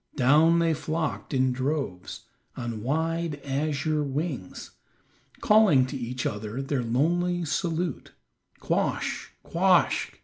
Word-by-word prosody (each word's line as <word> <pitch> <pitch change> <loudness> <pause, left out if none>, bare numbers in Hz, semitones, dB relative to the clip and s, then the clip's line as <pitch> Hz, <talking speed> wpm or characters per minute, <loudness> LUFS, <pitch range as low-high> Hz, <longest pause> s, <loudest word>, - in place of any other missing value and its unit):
Down 150 +6 +5
they 165 -1 +2
flocked 155 +1 -3
in 130 -2 +2
droves, 130 -8 -3 0.4
on 115 -3 -4
wide 160 +4 -1
azure 150 +2 -1
wings, 140 - -4 0.7
calling 205 -12 +5
to 130 - -6
each 125 -1 -4
other 105 +3 -3
their 135 -1 -1
lonely 175 +9 +1
salute, 165 -1 -2 0.5
"Quoskh, - - -1 0.2
quoskh." - - +2
145 Hz, 105 wpm, -26 LUFS, 130-165 Hz, 0.7 s, Down